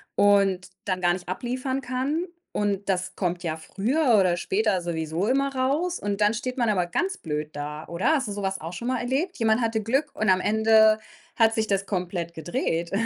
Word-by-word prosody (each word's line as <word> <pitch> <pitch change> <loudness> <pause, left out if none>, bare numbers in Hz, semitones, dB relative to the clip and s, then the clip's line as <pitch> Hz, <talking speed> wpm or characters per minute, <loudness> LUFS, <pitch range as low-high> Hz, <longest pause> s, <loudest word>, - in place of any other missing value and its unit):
und 195 -2 +3 0.2
dann 185 -2 -1
gar 175 -1 +3
nicht 180 -1 -6
abliefern 255 +7 -2
kann 270 +7 -1 0.3
und 200 -1 -1
das 185 -1 -1
kommt 175 -2 -1
ja 160 -1 -2
früher 235 - +1
oder 180 -2 +3
später 295 - +1
sowieso 165 +2 -2
immer 275 +2 +1
raus 290 +8 0
und 205 0 -3
dann 210 +1 +4
steht 255 +2 -4
man 235 -2 +2
aber 185 -4 +2
ganz 370 - -1
blöd 150 -1 -4
da, 150 +1 -6
oder? 170 +7 -2
Hast 270 -6 0
du 205 - -4
so 200 0 -4
was 195 0 -2
auch 165 +3 -6
schon 235 +6 -5
mal 255 -1 0
erlebt? 275 +10 -1
Jemand 225 0 +2
hatte 225 -1 0
Glück 270 +7 0
und 215 -2 0
am 185 - +5
Ende 220 +1 +4 0.4
hat 225 -1 +4
sich 220 -1 +1
das 195 -1 0
komplett 175 -3 -3
gedreht. 165 +1 -2
205 Hz, 200 wpm, -25 LUFS, 180-255 Hz, 0.4 s, am